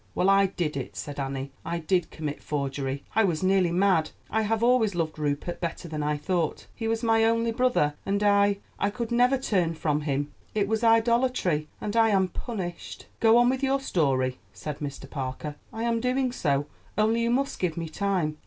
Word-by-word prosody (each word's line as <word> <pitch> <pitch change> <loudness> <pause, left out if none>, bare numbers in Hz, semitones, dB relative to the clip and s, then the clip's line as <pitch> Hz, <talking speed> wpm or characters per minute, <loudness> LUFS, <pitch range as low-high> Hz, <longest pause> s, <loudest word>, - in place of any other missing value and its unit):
"Well, 190 +2 +3
I 195 0 +5
did 170 -6 -3
it," 135 -3 -5
said 145 -1 -6
Annie; 135 0 -3
"I 170 - -2
did 175 +1 0
commit 150 -2 -5
forgery. 140 -1 -3
I 225 - +5
was 175 -4 0
nearly 185 -2 +3
mad. 180 -3 +3 0.2
I 220 - +2
have 220 +1 0
always 235 -5 +3
loved 160 -2 -2
Rupert 150 +3 -2
better 170 0 -4
than 155 -2 -4
I 150 0 -1
ought. 175 -4 0
He 225 - -4
was 225 +1 -1
my 225 -1 +4
only 230 +1 +2
brother, 230 -11 +2
and 200 +1 0
I—I 200 0 +2
could 230 +2 -4
never 250 +3 +4
turn 185 -10 0
from 150 -1 0
him. 145 -1 -2 0.2
It 205 -2 +1
was 220 +2 -1
idolatry, 225 -8 +3
and 210 +1 -4
I 225 -1 +5
am 190 -3 +2
punished." 180 -3 -6
"Go 225 0 +6
on 240 0 +5
with 260 +1 +1
your 275 0 +2
story," 135 - 0
said 150 -2 -6
Mr. 140 -2 -6
Parker. 135 +2 -5 0.2
"I 225 - -4
am 235 -1 +1
doing 255 +1 0
so; 145 - 0 0.3
only 220 +2 +3
you 235 - +1
must 270 +3 0
give 170 -3 -1
me 165 -1 -3
time. 170 -3 -1
190 Hz, 195 wpm, -27 LUFS, 150-225 Hz, 0.3 s, Go